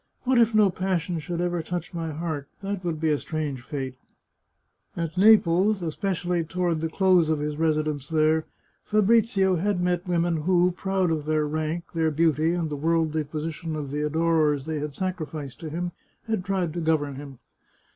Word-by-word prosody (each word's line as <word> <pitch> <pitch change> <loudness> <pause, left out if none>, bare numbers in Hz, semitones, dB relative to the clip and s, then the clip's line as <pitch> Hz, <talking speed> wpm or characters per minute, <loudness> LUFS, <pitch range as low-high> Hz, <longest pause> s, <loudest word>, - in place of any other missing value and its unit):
What 255 -1 +3
if 230 -1 +4
no 210 -3 +5
passion 180 -2 -1
should 170 +2 -4
ever 175 -1 0
touch 175 +2 -5
my 165 -1 -3
heart? 155 -2 -4
That 200 -1 -4
would 165 -3 -2
be 160 -1 +1
a 145 - +1
strange 150 -5 -3
fate! 130 0 -5 0.5
" - - -32
At 165 -1 -3
Naples, 195 -1 +5
especially 175 0 -1
toward 175 -1 -1
the 160 - -1
close 180 -2 +3
of 155 - +2
his 150 0 -3
residence 155 -3 0
there, 155 0 +2 0.4
Fabrizio 210 -3 +3
had 195 +2 0
met 180 0 0
women 170 -1 +1
who, 180 +3 +3
proud 190 -1 0
of 155 -2 -1
their 155 0 +1
rank, 155 +3 -2
their 160 -1 +2
beauty, 160 +1 +2
and 165 -3 -2
the - - -2
worldly 160 +1 +1
position 155 +2 -5
of 145 -3 -5
the 150 +1 -1
adorers 155 -2 +2
they 155 -1 -2
had 145 -1 -5
sacrificed 155 -7 -4
to 160 - -6
him, 175 +3 -3 0.3
had 220 -5 -1
tried 185 -4 -1
to 170 - -3
govern 150 -4 0
him. 140 -2 -9
165 Hz, 180 wpm, -25 LUFS, 155-180 Hz, 0.5 s, no